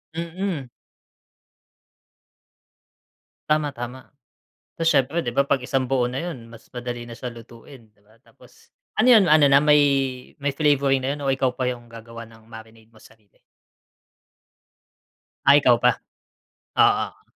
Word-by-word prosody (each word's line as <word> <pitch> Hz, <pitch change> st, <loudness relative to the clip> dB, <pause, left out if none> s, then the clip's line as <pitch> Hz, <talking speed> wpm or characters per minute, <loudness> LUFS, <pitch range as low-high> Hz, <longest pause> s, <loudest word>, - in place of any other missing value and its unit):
Mm. 170 Hz, -3 st, -4 dB, 2.8 s
Tama, 150 Hz, -2 st, 0 dB
tama. 120 Hz, +2 st, -8 dB, 0.7 s
Tapos 165 Hz, 0 st, +1 dB
siyempre 145 Hz, +3 st, +1 dB
'di 120 Hz, -, -3 dB
ba 140 Hz, +4 st, +1 dB
pag 135 Hz, -3 st, 0 dB
isang 130 Hz, 0 st, -1 dB
buo 125 Hz, -2 st, 0 dB
na 130 Hz, -, -5 dB
yun 135 Hz, -8 st, -7 dB
mas 115 Hz, -, -15 dB
madali 120 Hz, -1 st, -6 dB
na 120 Hz, -, -9 dB
siya 125 Hz, +1 st, -7 dB
lutuin 115 Hz, +1 st, -15 dB
'di 105 Hz, -, -34 dB
ba. 110 Hz, +2 st, -26 dB
Tapos -, -, -23 dB, 0.3 s
ano -, -, +3 dB
yun, 205 Hz, -, +5 dB
ano 155 Hz, -2 st, +6 dB
na 140 Hz, +1 st, +5 dB
may 150 Hz, 0 st, +5 dB, 0.6 s
may 145 Hz, -, 0 dB
flavoring 140 Hz, -3 st, +1 dB
na 140 Hz, -, -1 dB
yun 145 Hz, -, -9 dB
o 135 Hz, -, +1 dB
ikaw 130 Hz, -1 st, -1 dB
pa 125 Hz, -1 st, -1 dB
yung 120 Hz, -1 st, -8 dB
gagawa 115 Hz, 0 st, -11 dB
ng 110 Hz, -1 st, -19 dB
marinate 110 Hz, 0 st, -14 dB
mo, 110 Hz, -, -21 dB
sarili? 110 Hz, -2 st, -23 dB, 2.1 s
Ah, 140 Hz, -, +7 dB
ikaw 125 Hz, -4 st, +4 dB
pa, 120 Hz, 0 st, +1 dB, 0.8 s
oo. -, -, +1 dB
130 Hz, 145 wpm, -22 LUFS, 115-145 Hz, 2.8 s, Ah